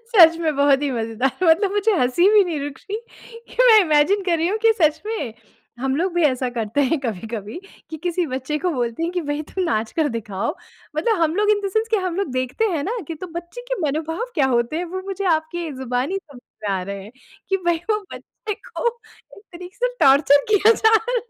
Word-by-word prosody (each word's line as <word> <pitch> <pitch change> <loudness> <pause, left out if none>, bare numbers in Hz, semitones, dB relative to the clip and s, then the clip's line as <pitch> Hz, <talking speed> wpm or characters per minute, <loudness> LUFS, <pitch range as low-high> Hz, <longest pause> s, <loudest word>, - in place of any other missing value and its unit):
सच 335 -5 +8
में, 320 -2 0
बहुत 280 0 +4
ही 290 - 0
मज़ेदार। 230 +2 -1
मतलब 360 +4 +4
मुझे 415 +2 +2
हँसी 255 +9 +3
भी 415 -2 +7
नहीं 330 -5 -3
रुक 280 -1 -6
रही 420 - -1 0.5
कि - - +1
मैं 440 - +9
इमेजिन 335 +3 +3
कर 345 -2 +2
रही 330 +2 +1
हूँ 420 +3 -1
कि 450 - +7
सच 310 0 +3
में, 290 - -4 0.5
हम 265 0 0
लोग 360 +4 0
भी 350 - +2
ऐसा 255 -3 +1
करते 230 +2 -2
हैं 285 +4 +1
कभी-कभी, 220 - -5 0.3
कि 320 - -5
किसी 345 +2 -1
बच्चे 265 +2 -3
को 360 +3 -1
बोलते 240 -1 -2
हैं 335 +1 -1
कि, 360 - -1
"भई, 290 0 -3
तुम 370 +4 -3
नाच 220 -7 -1
कर 315 -2 +1
दिखाओ।" 215 - -3 0.4
मतलब 360 +4 +1
हम 320 0 +2
लोग 420 +1 +3
इन 415 -1 +3
द - - 0
सेंस 440 +2 0
कि 445 - +3
हम 370 -3 -2
लोग 395 -6 -1
देखते 255 - -1
हैं 310 -4 -1
ना, 470 +4 -2
कि 330 - -4
तो 345 +4 -8
बच्चे 345 +8 -7
के - - -2
मनोभाव 320 +7 -2
क्या 285 -5 +3
होते 240 +2 0
हैं, 350 - -2
वो 370 +2 -5
मुझे 395 0 -4
आपकी 315 +1 -4
ज़ुबानी 260 +6 -2
समझ 285 -9 -15 0.2
में 210 - -3
आ 185 - -3
रहे 200 +1 -6
हैं 210 - -13 0.4
कि 385 - +2
भई, 345 -1 +3
वो 425 - +2
बच्चे 425 -1 -7
को 485 +2 -6 0.5
एक 400 - -15
तरीके 360 +2 -10
से - - -1
टॉर्चर 280 0 +5
किया 420 +2 +6
जा 445 0 +3
रहा 450 +3 +1
है। - - +1
320 Hz, 230 wpm, -21 LUFS, 265-385 Hz, 0.5 s, मैं